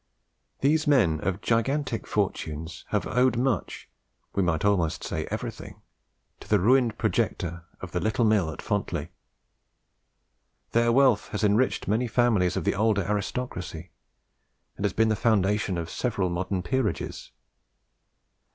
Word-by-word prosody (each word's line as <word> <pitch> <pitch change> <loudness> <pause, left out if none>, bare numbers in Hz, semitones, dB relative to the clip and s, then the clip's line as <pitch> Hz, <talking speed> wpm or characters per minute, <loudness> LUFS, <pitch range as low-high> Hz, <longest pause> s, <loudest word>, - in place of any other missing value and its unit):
These 150 +3 +2
men 105 - +4
of 95 +4 -2
gigantic 120 +2 0
fortunes 80 -5 -3
have - - 0
owed 125 -1 +2
much 125 -5 -1 0.5
we 100 - +1
might 90 -1 0
almost 90 -6 +1
say - - -3
everything - - -6 0.6
to - - -13
the 105 - +3
ruined 120 +3 +3
projector 85 -1 -1 0.2
of - - -7
"the - - -1
little 110 +2 +1
mill 105 -6 +3
at 80 - -7
Fontley." - - -2 1.6
Their 115 0 +3
wealth 130 -3 +4
has 105 0 -4
enriched 105 +5 +2
many 115 +4 +1
families 110 -7 +2
of - - -1
the - - +1
older 105 -1 +2
aristocracy, 100 -4 -4 0.8
and 100 - -3
has 100 - 0
been 110 0 +3
the 110 - +2
foundation 105 -3 +1
of 85 -1 -3
several 100 -2 -1
modern 90 +1 -2
peerages. 130 +1 -2
105 Hz, 135 wpm, -26 LUFS, 90-120 Hz, 1.6 s, men